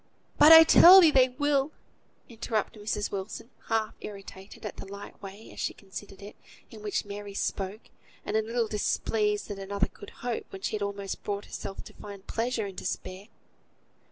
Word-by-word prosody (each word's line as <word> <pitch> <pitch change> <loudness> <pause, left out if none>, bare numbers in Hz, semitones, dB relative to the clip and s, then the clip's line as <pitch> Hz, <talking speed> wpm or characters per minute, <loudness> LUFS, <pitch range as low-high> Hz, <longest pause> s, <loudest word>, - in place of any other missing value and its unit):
"But 300 - +9
I 325 0 +12
tell 355 +3 +9
thee 330 -4 +7
they 260 -2 +5
will," 285 +2 0 0.6
interrupted 220 -2 -3
Mrs. 210 0 -2
Wilson, 205 +5 -6 0.2
half 220 -1 0
irritated 195 0 -10
at 210 - -6
the - - -8
light 200 +1 -10
way, 200 +2 -10
as - - -12
she - - -2
considered 195 0 -10
it, 205 - -10 0.4
in 220 -2 -11
which 210 0 -2
Mary 205 0 -8
spoke; 200 +2 -3 0.4
and 210 - -3
a 220 - +3
little 230 +1 -1
displeased 210 0 -1
that 200 -1 -6
another 195 0 -1
could - - -12 0.2
hope 240 -2 -3
when 195 0 -9
she - - -1
had 210 - -4
almost 200 -1 -4
brought 205 0 -3
herself 195 - -7
to - - -13
find 200 -1 -11
pleasure 230 -1 -2
in 195 - -7
despair. 185 +2 -6
210 Hz, 180 wpm, -28 LUFS, 200-230 Hz, 0.6 s, I